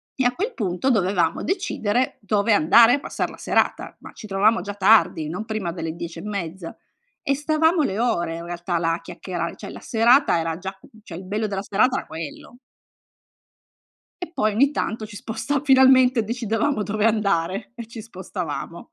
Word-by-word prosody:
e 265 - 0
a 245 0 +2
quel 425 - -2
punto 195 +2 -1
dovevamo 185 -6 +1
decidere 255 - -1
dove 205 +2 +1
andare 225 +9 +6
a - - -3
passar - - -3
la - - -12
serata, - - 0
ma - - -12
ci 215 - -10
trovavamo 200 +1 +2
già 200 +2 -6
tardi, 205 -7 +4
non 185 +7 -5
prima 215 -6 -3
delle 165 -2 -5
10 170 -1 -7
e - - -9
mezza. 190 -4 -5 0.5
E 275 - +1
stavamo 310 +3 +2
le 200 -6 -2
ore 170 -8 0
in 170 - -8
realtà 175 0 -3
là 165 0 +1
a 170 - -4
chiacchierare; - - -5
cioè - - -9
la - - -9
serata 240 - +3
era 165 0 -2
già 190 +2 -7 0.3
cioè 170 - -9
il 185 - -8
bello 210 +3 -2
della 195 -1 -3
serata 245 +6 +2
era - - -5
quello. 160 +8 -8 1.7
E 345 - -8
poi 215 -9 0
ogni 270 +7 +4
tanto 220 -6 -3
ci 205 - -12
sposta 275 +7 -3
finalmente 260 -3 +5
decidevamo 225 +2 -1
dove 210 +1 -1
andare 200 -5 0
e 235 -2 -9
ci 230 -2 -9
spostavamo. 185 -1 -6
210 Hz, 180 wpm, -23 LUFS, 180-245 Hz, 1.7 s, andare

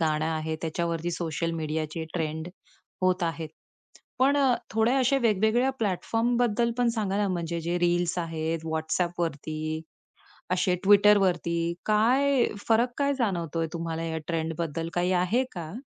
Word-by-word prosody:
गाणं 155 -1 +1
आहे 160 0 -2
त्याच्यावरती 170 +1 -2
सोशल 165 -1 -2
मीडियाचे 155 +1 -3
ट्रेंड 160 0 -2 0.5
होत 185 -1 +2
आहेत. 165 -2 -2 0.7
पण 275 +2 +4
अ, 270 -3 +4 0.2
थोडे 225 +3 +2
असे 270 +1 +3
वेगवेगळ्या 230 +2 +2
प्लॅटफॉर्मबद्दल 235 +3 +1
पण 245 - +3
सांगा 200 -3 -1
ना, 205 0 +1
म्हणजे 170 -2 -2
जे 170 +2 -1
रील्स 175 0 +1
आहेत. 165 -1 -3
WhatsAppवरती, 160 -1 -2 0.7
असे 180 0 +2
Twitterवरती. 195 -4 +5 0.3
काय 250 +5 +3 0.2
फरक, 230 +2 +4
काय 280 0 +2
जाणवतोय 170 - -1
तुम्हाला 165 -1 -3
या 160 -1 -2
ट्रेंडबद्दल? 165 -1 -2
काही 180 +1 +1
आहे 235 +8 +1
का? 165 -3 -6
175 Hz, 130 wpm, -27 LUFS, 165-220 Hz, 0.7 s, Twitterवरती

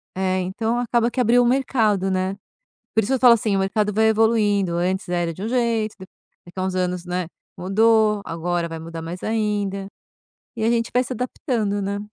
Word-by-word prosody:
É, 185 0 0
então 220 +6 -2
acaba 240 -1 +1
que 250 - -1
abriu 245 +1 +4
um - - +3
mercado, 225 -7 +1
né. 185 +1 -1 0.6
Por 220 - +3
isso 220 - -2
eu - - +1
falo 245 -2 +7
assim, 215 -3 0
o - - +1
mercado 210 +2 0
vai 220 +1 +4
evoluindo, 210 -5 +2
antes 185 +2 -1
era 175 -1 -1
de 185 - -9
um 215 - -2
jeito, 230 -3 0
de 190 - -10 0.4
daqui 175 +2 -13
a - - -1
uns 190 0 -2
anos, 180 -1 -1
né, 180 0 -2 0.3
mudou, 215 +2 +3
agora 170 +1 -2
vai 165 0 -6
mudar 165 0 -7
mais 170 +3 -7
ainda, 205 -3 -1 0.7
e 220 - -2
a 225 - +3
gente 230 -1 0
vai 250 - +4
se 255 - -6
adaptando, 225 -4 -2
né. 200 +1 -2
205 Hz, 205 wpm, -22 LUFS, 185-230 Hz, 0.7 s, falo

